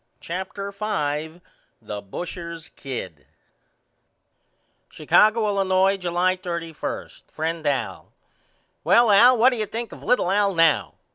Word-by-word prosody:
CHAPTER 190 Hz, +3 st, -5 dB
V 160 Hz, -6 st, -3 dB, 0.4 s
The 105 Hz, -1 st, -7 dB
Busher's 170 Hz, -, -7 dB
Kid 95 Hz, -, -8 dB, 1.6 s
Chicago, 215 Hz, +1 st, +3 dB
Illinois, 195 Hz, -1 st, +2 dB
July 180 Hz, 0 st, 0 dB
31. 170 Hz, -3 st, -5 dB, 0.2 s
FRIEND 160 Hz, 0 st, -3 dB
AL: 140 Hz, -2 st, -2 dB, 0.7 s
Well 235 Hz, -2 st, +5 dB
Al 240 Hz, +5 st, +7 dB
what 245 Hz, +4 st, +5 dB
do 245 Hz, -, -3 dB
you 215 Hz, -1 st, -2 dB
think 230 Hz, +2 st, -5 dB
of -, -, -11 dB
little 235 Hz, -6 st, +1 dB
Al 200 Hz, -1 st, +2 dB
now? 165 Hz, -3 st, +2 dB
185 Hz, 115 wpm, -23 LUFS, 165-205 Hz, 1.6 s, Al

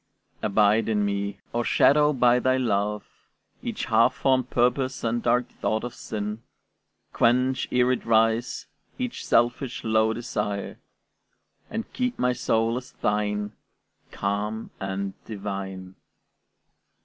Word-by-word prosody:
Abide 105 Hz, +2 st, +3 dB
in 105 Hz, -2 st, +1 dB
me; 100 Hz, 0 st, -2 dB, 0.2 s
o'ershadow 145 Hz, +5 st, +4 dB
by 125 Hz, -3 st, +4 dB
thy 130 Hz, +1 st, +2 dB
love 105 Hz, -4 st, 0 dB, 0.6 s
Each -, -, -3 dB
half -, -, +3 dB
formed 130 Hz, -2 st, +1 dB
purpose 130 Hz, +2 st, +1 dB
and 115 Hz, +1 st, 0 dB
dark 120 Hz, +1 st, +2 dB
thought 110 Hz, 0 st, -2 dB
of 120 Hz, -1 st, -5 dB
sin; 105 Hz, 0 st, -5 dB, 0.7 s
Quench, 125 Hz, +2 st, +2 dB
e'er 125 Hz, 0 st, +3 dB
it 125 Hz, -, -1 dB
rise, 115 Hz, +1 st, +2 dB, 0.3 s
each 250 Hz, -2 st, -4 dB
selfish, 120 Hz, +2 st, +1 dB
low 110 Hz, 0 st, +3 dB
desire, 105 Hz, -4 st, -3 dB, 0.9 s
And 225 Hz, -, -5 dB
keep 250 Hz, -1 st, -1 dB
my 125 Hz, 0 st, +2 dB
soul 115 Hz, 0 st, +1 dB
as 125 Hz, -, -8 dB
thine, 105 Hz, 0 st, -1 dB, 0.6 s
calm 105 Hz, +2 st, -3 dB
and 95 Hz, 0 st, -3 dB
divine. 95 Hz, -3 st, -6 dB
115 Hz, 115 wpm, -25 LUFS, 105-125 Hz, 0.9 s, o'ershadow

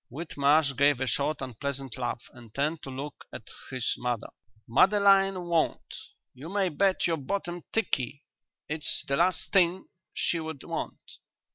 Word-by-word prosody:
Whitmarsh 145 Hz, 0 st, +2 dB
gave 140 Hz, -1 st, +4 dB
a 130 Hz, -, 0 dB
short, 140 Hz, +4 st, 0 dB
unpleasant 135 Hz, 0 st, -4 dB
laugh 120 Hz, -1 st, -3 dB
and 120 Hz, -3 st, -14 dB
turned 150 Hz, +3 st, 0 dB
to -, -, -8 dB
look 140 Hz, +3 st, -6 dB
at -, -, -8 dB, 0.3 s
his 130 Hz, -2 st, -1 dB
mother. 125 Hz, -2 st, -2 dB, 0.4 s
"Madeline 195 Hz, -, +5 dB
won't. 170 Hz, -2 st, 0 dB, 0.4 s
You 140 Hz, +6 st, -9 dB
may 195 Hz, -1 st, +1 dB
bet 190 Hz, +4 st, +2 dB
your 165 Hz, -1 st, +1 dB
bottom 175 Hz, +4 st, -3 dB
tikkie 140 Hz, -, -1 dB, 0.4 s
it's 150 Hz, +1 st, -1 dB
the 140 Hz, -1 st, +1 dB
last 175 Hz, +1 st, +1 dB
thing 185 Hz, -1 st, +4 dB, 0.3 s
she 170 Hz, -, 0 dB
would 160 Hz, -4 st, -6 dB
want." -, -, -6 dB
150 Hz, 145 wpm, -28 LUFS, 135-175 Hz, 0.4 s, Madeline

